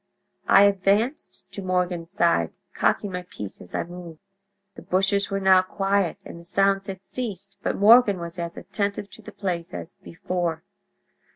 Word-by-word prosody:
I 195 - +7
advanced 200 - +1
to 200 - -7
Morgan's 180 -2 -1
side, 170 - +2 0.2
cocking 205 - +1
my 180 0 -3
piece 105 - -9
as 90 - -9
I - - 0
moved. 175 -2 -10 0.6
"The - - -11
bushes 195 +2 +1
were 195 -1 -1
now 190 -1 +6
quiet, 195 -1 0
and 170 - -9
the - - -13
sounds 195 +2 +1
had 190 -1 -7
ceased, 200 -6 -6
but - - -1
Morgan 215 -1 +6
was 170 +1 -7
as 170 0 -5
attentive 200 -1 -3
to - - -13
the - - -10
place 180 -3 -4
as - - -8
before. 170 -1 -3
190 Hz, 165 wpm, -24 LUFS, 170-200 Hz, 0.6 s, I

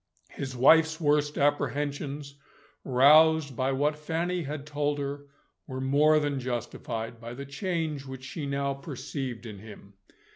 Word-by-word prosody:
His 135 -2 -6
wife's 160 +5 +5
worst 150 -1 +1
apprehensions, 145 0 -1 0.5
roused 150 +2 +5
by 130 +2 0
what 145 +3 +1
Fanny 165 +4 -2
had 145 -1 -5
told 145 0 -1
her, 140 0 -5 0.4
were 130 -1 -5
more 145 +4 +4
than 145 -2 -1
justified, 120 -2 -4
by 120 +1 -7
the 140 +2 -7
change 155 -2 -3
which 130 -1 -8
she 140 +2 -5
now 140 0 -1
perceived 135 -3 -6
in 105 -3 -8
him. 105 -1 -13
140 Hz, 140 wpm, -28 LUFS, 130-150 Hz, 0.5 s, wife's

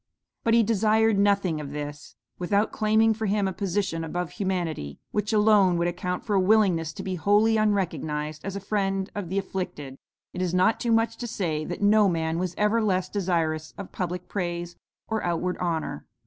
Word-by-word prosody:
"But 230 -1 +3
he 230 - +5
desired 220 0 +3
nothing 200 -6 +2
of 145 -1 -7
this. 145 0 -7 0.2
Without 200 +4 +1
claiming 220 +1 +3
for 220 0 -3
him 200 0 +1
a 190 - -2
position 190 -4 -2
above 175 +1 -3
humanity, 175 - -3
which 210 +1 -1
alone 210 -4 +4
would 170 0 +1
account 180 +1 -3
for 210 - -1
a 195 - +4
willingness 185 -5 +3
to - - -7
be 190 - -3
wholly 210 +5 +3
unrecognized 160 -8 -1
as 195 0 -4
a - - -2
friend 195 -1 -1
of 200 -5 -5
the 190 - -2
afflicted, 150 -8 -4 0.3
it 180 - -4
is 180 -1 0
not 185 +5 +3
too 235 - -1
much 225 0 +2
to 240 - -5
say 160 -8 -2
that 175 +4 -5
no 210 0 +5
man 165 -1 -1
was 180 -1 -2
ever 210 +2 +2
less 185 -3 0
desirous 165 -5 -1
of 200 - -8
public 180 -1 -4
praise 175 -2 -3 0.3
or 220 -1 -1
outward 175 +1 -1
honor. 170 -3 -3
190 Hz, 190 wpm, -26 LUFS, 170-210 Hz, 0.3 s, he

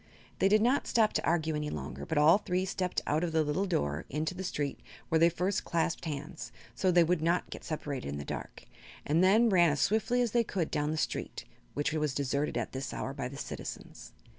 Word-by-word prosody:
They 195 - +4
did 215 +2 +4
not 255 +4 +2
stop 220 -2 +3
to - - 0
argue 160 -2 +1
any 150 0 -2
longer, - - -6
but 160 - -1
all 155 +6 +6
three 185 -2 -1
stepped 185 -1 -2
out 155 +3 +1
of 170 -2 -2
the 160 -1 +3
little 170 +7 -1
door 75 - -1
into 155 +5 -2
the 185 +1 -6
street, 145 -6 -3 0.3
where 160 - +3
they 165 +1 +6
first 185 +4 -1
clasped 165 0 -1
hands, 150 0 -5 0.2
so 185 - +1
they 175 -1 +6
would 170 0 +1
not 170 +2 0
get - - -7
separated 145 - -4
in 70 +1 -4
the 70 - -6
dark, - - -7 0.4
and 160 +5 +3
then 215 +5 +5
ran 175 -4 +5
as 145 -1 -1
swiftly 220 - +2
as 235 - -1
they 235 +1 +3
could 185 -7 -2
down 150 -1 0
the 155 - -1
street, - - -3 0.3
which 145 +2 0
was 150 -4 -1
deserted 140 -1 -1
at 120 - -2
this 135 +1 -5
hour 135 - -3
by 135 -3 -4
the 140 +2 -9
citizens. - - -7
160 Hz, 225 wpm, -31 LUFS, 150-185 Hz, 0.4 s, all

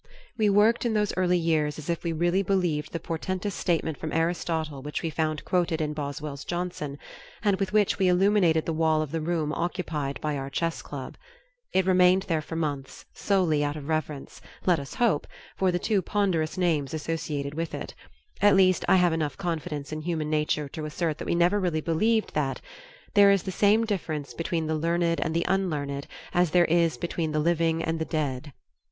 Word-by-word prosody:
We 215 -3 +2
worked 210 +3 +4
in 235 -2 0
those 210 -1 +1
early 180 -1 +2
years 155 -3 +1
as 155 - -8
if 170 -1 -2
we 170 - -1
really 175 +4 +1
believed 175 -6 0
the 165 - -3
portentous 185 +5 -3
statement 165 -3 -1
from 155 - -4
Aristotle 165 -3 -1
which 150 +4 -4
we 165 - -1
found 155 -1 -2
quoted 175 -3 +1
in 150 -1 -1
Boswell's 145 -1 -5
Johnson 175 -5 -4 0.5
and 200 -3 +2
with 195 -1 -1
which 210 -1 +2
we 190 - +3
illuminated 180 -3 +3
the 165 - -1
wall 160 -1 +2
of 150 - -7
the 165 0 -2
room 155 -2 -1
occupied 160 -5 -3
by 150 -1 -2
our 135 0 -4
Chess 165 +4 -2
Club; 135 -3 -8 0.5
it 190 -1 +2
remained 185 0 +5
there 165 -5 -1
for 165 - -7
months, 145 -4 -4
solely 175 -7 +1
out 145 0 -1
of 145 -2 -8
reverence, 155 -3 -3 0.2
let 175 -4 +4
us 140 -1 -8
hope, 220 -12 +1 0.3
for 190 -1 +2
the 175 - 0
two 200 +2 +1
ponderous 185 -4 0
names 160 -6 0
associated 150 -3 -3
with 165 +1 -3
it; - - -6 0.5
at 205 -1 +6
least 185 -2 +4
I - - +6
have 180 -2 +4
enough 155 -3 -2
confidence 155 -5 -4
in 155 0 -4
human 155 -2 -2
nature 150 -1 0
to 155 +2 -6
assert 155 0 -2
that - - -5
we - - +1
never 175 +4 +3
really 175 -5 0
believed 215 +8 +1
that 140 -3 -1 0.5
"There 200 -1 +7
is 200 -2 +3
the 190 - -4
same 210 +4 +3
difference 160 -9 -3
between 165 -1 -2
the 160 - -1
learned 170 +1 +1
and 165 0 -1
the 170 - +1
unlearned 150 -7 -1 0.3
as 175 -1 +3
there 175 +2 +4
is 170 -1 +2
between 165 -2 -2
the 155 - +1
living 165 0 +1
and 165 0 -1
the 160 - -1
dead." 145 -3 -3
165 Hz, 195 wpm, -27 LUFS, 155-180 Hz, 0.5 s, There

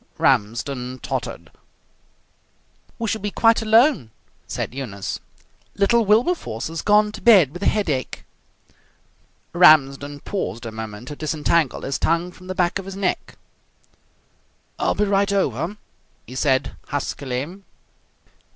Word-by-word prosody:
Ramsden 125 +4 0
tottered. - - -5 1.5
"We 230 - -3
shall 220 0 -2
be 205 - -2
quite 225 +2 +3
alone," 225 - +4 0.4
said - - -4
Eunice. 105 -8 -5 0.6
"Little 225 +3 +3
Wilberforce 215 - +1
has 165 -1 -4
gone 210 0 +3
to - - -10
bed 195 - +6
with 175 - -8
a - - +1
headache." 155 - -1 1.3
Ramsden 145 -4 +4
paused 120 - -4
a 115 - -5
moment 110 +1 -7
to 145 - -6
disentangle 155 -1 0
his 135 - -2
tongue 170 +2 0
from 185 +1 -15
the 185 - -4
back 180 +1 +1
of 195 - -8
his 195 0 -7
neck. 195 -2 -2 1.4
"I'll - - +1
be - - +1
right 200 0 +1
over!" 180 - -1 0.5
he - - -11
said 130 0 0
huskily. 145 +4 -4
165 Hz, 125 wpm, -22 LUFS, 130-200 Hz, 1.5 s, bed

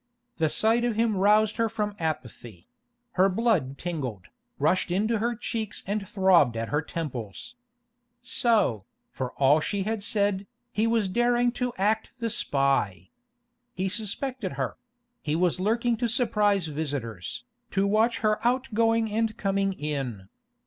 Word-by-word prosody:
The 160 -2 +2
sight 225 +7 +2
of 240 -2 0
him 225 -1 +2
roused 210 +2 +3
her 230 -1 +1
from 210 -2 -2
apathy; 120 - -5 0.4
her 190 -1 +4
blood 185 - +1
tingled, 130 - -4 0.3
rushed 155 +6 +1
into 215 +5 +1
her 235 +2 0
cheeks 220 -1 -4
and 200 0 -2
throbbed 180 - +4
at 115 0 -3
her 150 +1 +1
temples. 130 - -6 0.7
So, 215 - +2 0.3
for 130 -1 -4
all 140 +3 +4
she 195 +5 -2
had 220 +1 -2
said, 200 -1 0 0.2
he 220 -1 +1
was 225 -3 +2
daring 240 +4 +2
to 250 0 -2
act 210 +3 +1
the 230 -2 -2
spy! 135 - 0 0.6
He 185 +1 -1
suspected 220 +2 -3
her; - - -3 0.5
he 150 0 -1
was 180 +1 +1
lurking 230 +4 +1
to 240 - 0
surprise 210 - +2
visitors, 140 - -4 0.3
to 195 0 +1
watch 220 +3 +2
her 215 -1 +2
outgoing 230 -3 +2
and 225 0 0
coming 195 -1 +1
in. 135 - -4
200 Hz, 140 wpm, -27 LUFS, 150-225 Hz, 0.7 s, her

